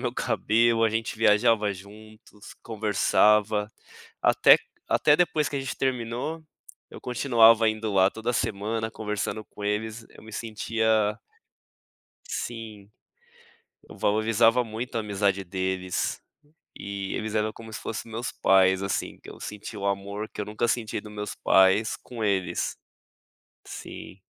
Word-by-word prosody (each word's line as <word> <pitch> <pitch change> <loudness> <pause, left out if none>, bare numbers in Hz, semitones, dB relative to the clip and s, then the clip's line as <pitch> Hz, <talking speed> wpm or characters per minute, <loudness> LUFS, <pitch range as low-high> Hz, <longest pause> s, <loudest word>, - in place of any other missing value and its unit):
meu - - -1
cabelo, 115 +1 +2
a 115 - +5
gente 115 0 -2
viajava 105 -1 +3
juntos, 105 +2 -14
conversava, 105 -1 +2 0.5
até - - +6 0.3
até 150 0 +4
depois 160 -4 +1
que - - -8
a 140 - -1
gente 135 - -5
terminou, 130 +5 -2 0.5
eu - - -11
continuava 115 -3 +4
indo 110 -1 -2
lá 95 0 +4
toda 115 +2 -3
semana, 110 +1 -2
conversando 105 0 -4
com 105 - -13
eles, 110 +2 -2
eu - - -16
me 110 - -12
sentia 110 -1 0 1.1
Sim, 110 -3 -6 1.0
eu - - -12
valorizava 115 +3 +3
muito 115 +2 -6
a 115 - +1
amizade 100 -2 0
deles 95 0 -2 0.6
e 100 -1 -5
eles 110 0 -3
eram 110 0 0
como 110 -1 -12
se - - -6
fossem 115 +1 -5
os - - -11
meus 120 +2 -4
pais, 95 0 +4
assim, 100 - -3
que - - -11
eu - - -11
senti 105 +1 -7
o 100 -1 -3
amor 100 +2 -3
que - - -8
eu - - -1
nunca 105 +3 -1
senti 115 -3 -1
dos 105 -1 -12
meus 105 0 -5
pais, 95 +3 +3
com 115 -3 -9
eles 95 -3 -1 0.9
sim. - - -9
110 Hz, 145 wpm, -26 LUFS, 100-115 Hz, 1.1 s, até